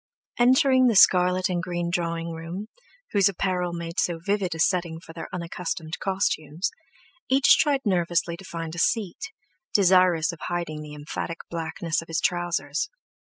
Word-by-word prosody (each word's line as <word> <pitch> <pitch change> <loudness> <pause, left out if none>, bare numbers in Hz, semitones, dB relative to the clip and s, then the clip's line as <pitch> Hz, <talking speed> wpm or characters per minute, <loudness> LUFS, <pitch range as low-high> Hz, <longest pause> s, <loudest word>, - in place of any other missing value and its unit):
Entering 260 +1 +5
the 230 - +2
scarlet 185 -1 +5
and 175 -2 -1
green 175 -1 -3
drawing 170 -1 -2
room, 170 +6 -6 0.4
whose 200 -1 +4
apparel 180 -2 -1
made 170 0 -4
so 170 -2 +1
vivid 190 0 -1
a - - -8
setting 170 -2 +1
for 165 -1 -13
their 165 -1 -7
unaccustomed 170 -2 -4
costumes, 190 -2 -1 0.6
each 265 0 +5
tried 285 -3 +2
nervously 175 -3 +1
to 185 - -13
find 165 -2 -6
a 170 - -5
seat, 225 - -1 0.4
desirous 180 -3 +4
of 170 - -11
hiding 170 -3 -4
the 150 -1 -9
emphatic 150 +3 -5
blackness 165 -1 -2
of 165 - -13
his 165 -1 -1
trousers. 170 - -1
175 Hz, 150 wpm, -25 LUFS, 165-190 Hz, 0.6 s, Entering